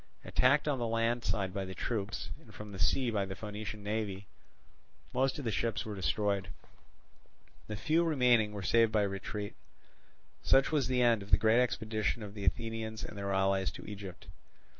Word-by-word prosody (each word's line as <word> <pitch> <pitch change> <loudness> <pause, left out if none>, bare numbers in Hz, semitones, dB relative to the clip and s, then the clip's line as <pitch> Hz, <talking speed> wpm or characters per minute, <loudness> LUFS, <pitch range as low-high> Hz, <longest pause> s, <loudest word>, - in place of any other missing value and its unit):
Attacked 140 +4 +3
on 140 -3 +1
the 120 - 0
land 115 +1 +1
side 95 -2 -1
by 100 -1 -2
the 95 0 -7
troops, 100 +2 -3
and - - -16
from 105 -1 -8
the 95 - -8
sea 120 +8 +2
by 105 -3 +1
the 95 0 -5
Phoenician 105 0 -6
navy, 105 -2 -2 0.9
most 130 +1 +1
of 145 - -5
the 115 - 0
ships 115 +3 -1
were 110 - -4
destroyed; 100 +1 0 1.2
the 105 - -4
few 160 +9 +2
remaining 125 -9 +4
being 105 -2 -6
saved 115 +2 +4
by 105 -2 +3
retreat. 100 +1 -4 0.9
Such 135 +2 +4
was 145 -6 +2
the 125 -1 +2
end 115 -3 +4
of 100 - -10
the - - +6
great 110 +2 +4
expedition 110 -2 -1
of 100 -1 -7
the 100 -2 -5
Athenians 110 +3 -2
and - - -6
their 100 -1 -3
allies 95 0 +2
to - - -9
Egypt. 100 -3 -8
110 Hz, 185 wpm, -32 LUFS, 100-120 Hz, 1.2 s, the